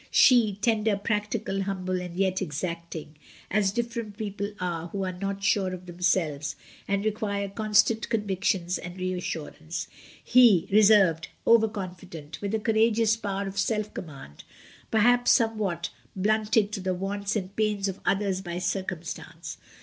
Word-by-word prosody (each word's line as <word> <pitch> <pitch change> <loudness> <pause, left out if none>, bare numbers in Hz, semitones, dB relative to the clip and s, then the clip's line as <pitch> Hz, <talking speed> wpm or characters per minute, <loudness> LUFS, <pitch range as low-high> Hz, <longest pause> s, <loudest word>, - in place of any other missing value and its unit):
She, 235 -6 +5
tender, 220 -3 +2
practical, 210 0 -1
humble 185 -2 -2
and 180 -1 -7
yet 190 -1 +1
exacting, 165 0 -5 0.3
as 205 -1 +3
diffident 230 -2 -3
people 205 -1 -4
are 170 -2 -3
who 195 +2 -3
are 185 - -2
not 195 +2 -4
sure 195 -2 +2
of 180 0 -12
themselves 170 -5 0 0.3
and 200 +1 0
re 215 - +3
quire 200 -1 -3
constant 215 +2 +2
convictions 190 -4 0
and 180 +1 -8
reassurance. 170 -3 -4 0.4
He, 235 -8 +6
reserved, 200 -6 +5 0.2
over 230 -1 +6
confident, 180 -7 -8
with 205 +1 -1
a - - 0
courageous 220 0 +3
power 200 -3 -3
of 195 0 -4
self 210 +1 0
command, 135 - -9 0.5
perhaps 245 +3 +4
somewhat 215 - +1 0.2
blunted 215 +1 +2
to 210 - -3
the 185 -1 -1
wants 200 +2 -3
and 195 -1 -3
pains 210 -2 0
of 195 0 -4
others 195 -1 0
by 175 -2 -5
circumstance. 180 -2 -4
195 Hz, 140 wpm, -27 LUFS, 180-215 Hz, 0.5 s, He